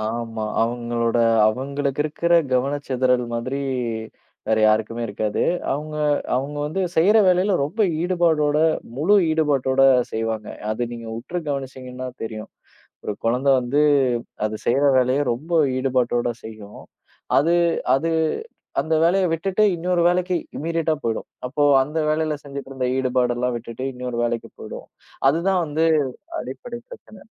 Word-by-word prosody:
ஆமா. 115 0 -3 0.2
அவங்களோட 120 0 -1 0.3
அவங்களுக்கு 140 +4 -2
இருக்கிற 170 +3 +1 0.2
கவனச்சிதறல் 130 -1 +1
மாதிரி 130 +4 -3 0.9
வேற 110 - +3
யாருக்குமே 110 +2 +2
இருக்காது. 105 0 -2 0.3
அவங்க, 150 +2 -4 0.4
அவங்க 140 +3 -3
வந்து 160 +6 -3
செய்யற 195 +7 +5
வேலையில 185 +2 +3
ரொம்ப 165 +11 -5 0.2
ஈடுபாடோட 165 -5 +2 0.4
முழு 175 +9 +4
ஈடுபாட்டோட 140 -4 +2 0.3
செய்வாங்க. 110 -1 -2 0.2
அது 110 +3 -2
நீங்க 115 -1 -7
உற்று 145 +9 -5
கவனிச்சீங்கன்னா 130 -2 -5
தெரியும். 110 -1 -6 0.6
ஒரு 105 - -2
குழந்தை 125 +4 +2
வந்து, 130 +4 +1 0.6
அது 110 0 -1
செய்யற 135 +4 +3
வேலைய 130 +3 +2
ரொம்ப 150 +9 -7 0.2
ஈடுபாட்டோட 125 -2 +1 0.2
செய்யும். 110 -2 -10 0.6
அது 160 +4 +2 0.4
அது 155 +5 0 0.7
அந்த 160 0 0
வேலைய 185 +3 +3
விட்டுட்டு 190 +5 +1
இன்னொரு 175 +1 0
வேலைக்கு 180 +1 +1 0.2
இம்மீடியட்டா 165 0 0
போயிடும். 115 -1 -2 0.2
அப்போ 140 +3 -1 0.2
அந்த 150 +4 -6
வேலையில 155 0 0
செஞ்சிட்டு 140 -1 -8
இருந்த 130 -1 -2
ஈடுபாடுலாம் 125 -1 0
விட்டுட்டு 115 +2 -7
இன்னொரு 125 -1 -5
வேலைக்கு 120 -1 -2
போயிடும். - - -8 0.4
அதுதான் 175 +5 +1
வந்து 155 +2 +1 0.6
அடிப்படை 135 - -7
பிரச்சனை. 215 - -13
135 Hz, 125 wpm, -22 LUFS, 120-160 Hz, 0.9 s, செய்யற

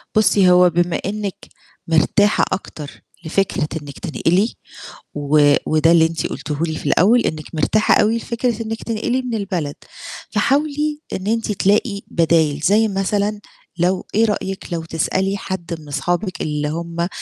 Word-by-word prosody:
بُصّي، 200 -3 +4
هو 180 0 +6
بما 175 0 0
إنِّك 205 -1 -3 0.5
مرتاحة 165 +6 +3
أكتر 155 -6 -6 0.2
لفكرة 175 -2 0
إنِّك 145 -1 -10
تنقلي 185 +4 0 0.6
و 145 0 +3
وده 155 +1 +3
اللي 165 -1 +6
أنتِ 165 0 -2
قُلتيه 150 +1 -5
لي 160 -1 -1
في - - -11
الأول 220 +8 +4
إنِّك 155 -7 -2
مرتاحة 215 +8 +2
أو 210 - +4
لفكرة 230 0 -2
إنِّك 225 0 -5
تنقلي 235 +3 -1
من 250 -2 -5
البلد. 180 -9 -3 0.6
فحاولي 295 +1 0
إن 190 - -4
أنتِ 225 0 0
تلاقي 200 +1 +1
بدايل، 160 -3 +2
زي 210 +8 +3
مثلًا 205 +1 -1 0.4
لو 180 +2 0
إيه 225 +2 +4
رأيِك 195 -4 -3
لو 165 -1 -3
تسألي 190 +5 -1
حد 190 -3 -5
من 150 - -14
أصحابِك 175 +7 -2
اللي 150 -1 -2
هم 170 +2 -3
185 Hz, 145 wpm, -19 LUFS, 160-215 Hz, 0.6 s, هو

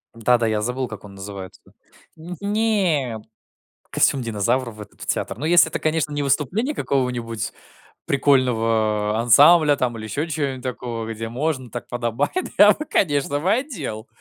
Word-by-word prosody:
Да-да, 115 0 +2
я 110 -1 0
забыл, 125 +3 -2
как 110 -2 -9
он 100 -1 -12
называется. 95 -1 -9 0.5
Нь 170 +3 -9
нет. 195 - 0 0.7
Костюм 135 -2 +2
динозавра 115 +3 -1
в 105 -1 -13
этот 105 - -13
в - - -7
театр. - - -2
Но 150 - -5
если 170 -1 +5
это, - - -4
конечно, 155 -1 0
не 145 0 -2
выступление 160 - 0
какого-нибудь 120 -4 -2 0.5
прикольного 115 -6 +1
ансамбля 145 +6 +6
там 125 -3 -1
или 110 - -7
еще 145 +9 -3
чё-нибудь 140 -4 -3
такого, 120 -3 -4
где 115 +1 -5
можно, 130 0 -2
так 120 - -7
подобает, 120 -1 -2 0.3
я 205 0 +8
бы, 305 - -2
конечно 145 - 0
бы, 180 +6 +1
одел. 165 - -3
130 Hz, 155 wpm, -22 LUFS, 115-155 Hz, 0.7 s, я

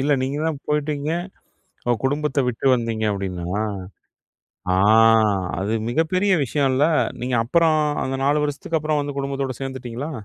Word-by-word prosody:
இல்ல, 145 +2 +2
நீங்க 135 +2 -2
தான் 150 -3 -2
போய்ட்டீங்க 150 -1 -1 0.8
ஓ - - +5
குடும்பத்த 145 +1 0
விட்டு 125 +2 -3
வந்தீங்க 115 -2 -2
அப்படின்னா? 95 0 -3 1.1
ஆ. - - +2 0.8
அது 100 +3 -1 0.2
மிகப்பெரிய 185 +8 +1
விஷயம்ல? 135 +1 +1 0.4
நீங்க 125 0 -1
அப்பறம் 160 +5 +3 0.2
அந்த 135 0 -2
4 145 +2 +2
வருஷத்துக்கு 150 +3 -2
அப்பறம் 155 0 0
வந்து 145 -1 -5
குடும்பத்தோட 135 -1 -2
சேர்ந்துட்டீங்களா? 130 +1 -5
140 Hz, 130 wpm, -22 LUFS, 125-150 Hz, 1.1 s, ஓ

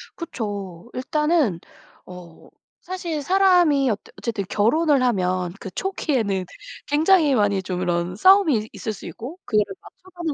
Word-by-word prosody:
그쵸. 205 - -6
일단은 300 - +1 0.5
어 180 -2 -13 0.3
사실 345 -4 -4
사람이 355 -6 +4
어 215 - +1 0.2
어쨌든 220 -4 -3
결혼을 280 +8 +2
하면 185 -6 0
그 190 - -8
초기에는 235 - -1 0.4
굉장히 310 0 +4
많이 205 -5 +1
좀 180 -1 -4
이런 175 0 -1
싸움이 370 - +5
있 215 0 -5
있을 220 - -4
수 - - -11
있고 255 +9 -8
그거를 210 -3 +1
맞춰가는 355 -4 -7
245 Hz, 285 characters per minute, -22 LUFS, -, 0.5 s, 싸움이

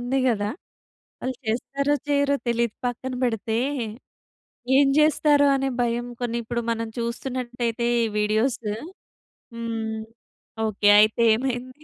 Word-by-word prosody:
ఉంది 245 +3 0
గదా! 205 -3 0 0.7
వాళ్ళు 260 0 -2
చేస్తారో, 275 +6 0
చెయ్యరో 285 0 +2
తెలియదు. 235 -1 +1
పక్కన 255 +2 -3
పెడితే 225 -1 -1 1.2
ఏం 280 0 +6
జేస్తారో 300 -1 +4
అనే 270 0 0
భయం. 240 0 -1 0.2
కొన్ని 235 -1 -1
ఇప్పుడు 235 +1 -2
మనం 230 0 -2
చూస్తునట్టయితే 240 -1 -2 0.2
ఈ - - +1
వీడియోసు 215 +1 0 0.8
హ్మ్, 225 -1 -3 0.7
ఓకే. 205 0 +2
అయితే 215 +2 +4
ఏమైంది? 255 +3 -4
240 Hz, 110 wpm, -24 LUFS, 225-265 Hz, 1.2 s, ఏం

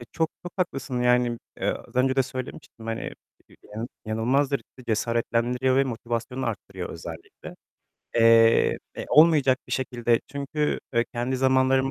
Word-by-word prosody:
Eee, 120 - -10
çok, 160 -1 0
çok 175 - -7
haklısın 135 -8 -2
yani, 125 -1 +2 0.2
eee, - - -1
az - - -8
önce 130 +1 +2
de 135 - +5
söylemiştim 130 -3 -8
hani, 115 0 -4 0.6
yani, 115 +3 -4 0.2
inanılmazdır. 130 +6 +1 0.2
Cesaretlendiriyor 120 +3 +1
ve 135 - +4
motivasyonu 120 +1 -3
arttırıyor 95 -5 -5
özellikle. 80 0 -9 0.6
Eee, 115 0 +5 0.2
eee, - - -5
olmayacak 150 -5 +5
bir - - -7
şekilde 120 -3 +1
çünkü, 140 +2 -2 0.2
eee, 115 0 +3
kendi 120 +2 -1
zamanlarımı 130 0 +3
125 Hz, 135 wpm, -25 LUFS, 115-135 Hz, 0.6 s, de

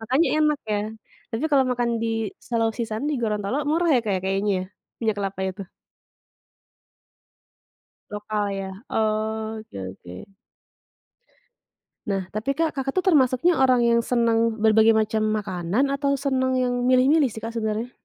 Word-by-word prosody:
makanya 260 +9 +2
enak 300 -1 +2
ya, 205 - +1 0.5
tapi 225 +7 -2
kalau 275 -2 +4
makan 240 -1 0
di 230 - 0 0.4
Selau 230 -2 +1
Sisan 220 -1 -3
di 300 - 0
Gorontolo 210 +2 -1
murah 340 +2 +2
ya - - +3
Kak 195 -3 0
kayaknya 195 +2 0
ya? - - -4 0.4
Minyak 220 -3 0
kelapa 195 -1 -3
itu. 190 +2 -6 2.5
Lokal 210 0 -2
ya, 190 0 -6 0.2
oke 220 - -2 0.2
oke. 90 - -12 1.8
Nah 195 -2 -2
tapi 235 +7 -2
Kak, 325 +1 +1
Kakak 270 0 -2
tuh 370 - 0
termasuknya 275 +3 +3
orang 255 -2 +4
yang 235 0 +4
senang 230 -2 +2
berbagai 220 0 +5
macam 220 0 +1
makanan 205 +6 -1
atau 280 0 0
senang 260 -2 0
yang 245 -1 0
milih-milih 265 +4 +4
sih 220 - -9
Kak 230 +1 -6
sebenarnya? 220 +2 -2
230 Hz, 140 wpm, -24 LUFS, 215-260 Hz, 2.5 s, berbagai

